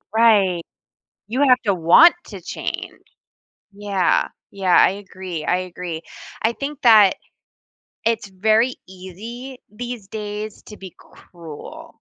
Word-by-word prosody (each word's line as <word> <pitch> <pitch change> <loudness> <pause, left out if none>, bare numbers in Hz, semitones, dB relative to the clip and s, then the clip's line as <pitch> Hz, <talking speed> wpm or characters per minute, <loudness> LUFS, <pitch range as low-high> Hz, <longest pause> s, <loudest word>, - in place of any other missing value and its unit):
Right. 200 -6 +4 0.7
You 255 +6 -2
have 255 0 +5
to 200 - +3
want 180 - +6
to 195 -4 -9
change. - - -6 0.7
Yeah, 200 -3 0 0.2
yeah. 190 -3 +1
I - - +6
agree, 185 -5 -7
I 180 - +2
agree. 180 -2 -6 0.4
I 225 +1 +2
think 280 +2 -6
that 215 -5 +6 0.9
it's 225 -2 0
very 220 +6 +2
easy 220 +8 -9
these 240 -2 -7
days 210 0 -6
to 210 - -12
be 190 -2 -11
cruel. 165 -4 -12
205 Hz, 120 wpm, -21 LUFS, 185-230 Hz, 0.9 s, want